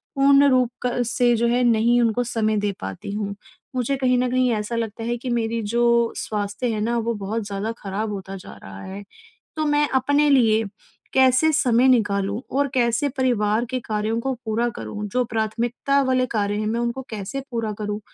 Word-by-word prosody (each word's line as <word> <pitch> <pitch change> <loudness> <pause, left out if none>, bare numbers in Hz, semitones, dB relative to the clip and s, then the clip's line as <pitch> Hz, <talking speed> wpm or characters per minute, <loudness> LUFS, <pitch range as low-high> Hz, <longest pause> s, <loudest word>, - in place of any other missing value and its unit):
पूर्ण 280 +1 +5
रूप 255 -2 +3 0.2
क 245 0 0
से 240 0 +2
जो 235 +1 +2
है 245 +1 +2
नहीं 235 +1 +3
उनको 235 +1 +1
समय 220 -2 0
दे 205 0 0
पाती 95 - -6
हूँ। 205 -1 -3 0.4
मुझे 255 +2 0
कहीं 255 -1 +2
न 250 0 +1
कहीं 255 -1 +2
ऐसा 210 +2 -3
लगता 225 0 -3
है 240 +1 -1
कि 250 +1 -6
मेरी 230 -1 -1
जो 235 +2 +2
स्वास्थ्य 205 +3 -3
है 215 - -2
ना, 235 +2 0
वो 230 0 -1
बहुत 210 +2 -3
ज़्यादा 200 +2 -3
खराब 210 +2 -4
होता 195 0 -6
जा - - -11
रहा 95 0 -9
है। 195 +2 -7 0.5
तो 310 - 0
मैं 295 0 +3
अपने 285 +3 +3
लिए 225 -5 +4 0.5
कैसे 265 +4 +4
समय 255 -4 +3
निकालूँ 205 -3 +2 0.2
और 285 0 +2
कैसे 240 +3 +2
परिवार 230 -3 +1
के 255 -1 -2
कार्यों 220 +1 -2
को 265 +1 -2
पूरा 230 +2 0
करूँ, 210 0 -6
जो 250 +4 0
प्राथमिकता 235 +5 0
वाले 255 -1 +1
कार्य 205 0 0
हैं 215 - -2
मैं 230 +2 -1
उनको 240 +2 -2
कैसे 215 +6 -4
पूरा 225 -3 -2
करूँ, 210 0 -3
235 Hz, 190 wpm, -23 LUFS, 210-250 Hz, 0.5 s, पूर्ण